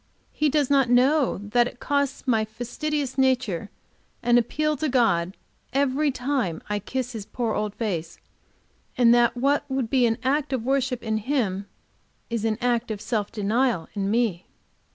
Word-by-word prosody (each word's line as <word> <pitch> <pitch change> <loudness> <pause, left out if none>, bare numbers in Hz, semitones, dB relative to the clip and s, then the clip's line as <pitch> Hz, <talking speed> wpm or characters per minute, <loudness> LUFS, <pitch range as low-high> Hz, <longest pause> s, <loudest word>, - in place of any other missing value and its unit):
He 305 0 +1
does 285 -1 +1
not 270 -3 +4
know 260 +3 +3
that 240 +2 +3
it 245 - -10
costs 280 -2 -1
my 225 -3 +3
fastidious 260 +5 -3
nature 245 -8 +1 0.5
an 240 0 +5
appeal 305 +6 0
to 310 +2 -1
God 195 -8 +1 0.4
every 280 +2 +2
time 250 - -1
I 210 0 -1
kiss 250 +4 -4
his 220 -4 -7
poor 235 -3 -2
old 210 -1 -2
face, 175 -7 -3 0.8
and 240 -1 +6
that 240 0 +3
what 280 +4 +2
would 265 -4 -2
be 255 -3 +4
an 225 -1 0
act 280 +2 0
of 250 -4 -1
worship 265 -2 0
in 220 -1 0
him 210 -6 -1 0.6
is 230 -2 -1
an 220 -1 0
act 240 -1 0
of 215 -2 -3
self 210 -2 -2
denial 220 -3 0
in 200 -1 -2
me. 215 -6 0
245 Hz, 165 wpm, -25 LUFS, 215-270 Hz, 0.8 s, and